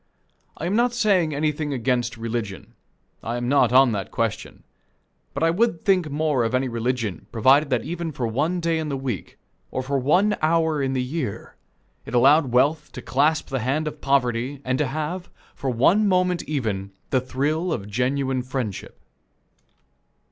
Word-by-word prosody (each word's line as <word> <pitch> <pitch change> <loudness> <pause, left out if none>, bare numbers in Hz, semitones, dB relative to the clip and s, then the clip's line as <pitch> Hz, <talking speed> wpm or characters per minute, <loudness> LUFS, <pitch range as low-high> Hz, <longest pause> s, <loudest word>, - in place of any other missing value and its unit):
I 160 - -4
am 185 +4 0
not 240 +1 +2
saying 195 -8 +2
anything 150 0 -1
against 125 -1 -1
religion. 115 -4 -5 0.5
I 115 +1 -3
am 120 0 -3
not 140 -1 +3
on 130 0 +6
that 100 -3 -3
question; - - -3 0.7
but - - -1
I 165 - +4
would 220 +1 0
think 185 -6 +3
more 145 -3 +1
of 115 +2 0
any 130 +1 +1
religion, 115 -5 -2
provided 135 +6 +4
that - - 0
even 170 -1 -4
for 130 -4 -3
one 150 +11 0
day 165 -1 0
in 155 -1 -3
the 140 - -2
week, 125 - -5 0.3
or 130 - -3
for 135 +1 -1
one 185 +11 +3
hour 160 -1 +2
in 135 -1 0
the 130 -1 0
year, 125 -5 -5 0.5
it - - -6
allowed 135 +2 +5
wealth 150 +5 +2
to 125 - -7
clasp 145 +7 +1
the 135 - -1
hand 140 +7 -1
of 155 - -6
poverty 130 0 0
and 130 +1 0
to 150 - +1
have, 155 +7 -4 0.2
for 135 - -4
one 170 - +3
moment 180 -2 +2
even, 105 -9 -2 0.2
the 130 - +2
thrill 150 +7 -1
of 100 -10 -3
genuine 130 +4 0
friendship. 125 -5 -5
140 Hz, 170 wpm, -23 LUFS, 125-160 Hz, 0.7 s, on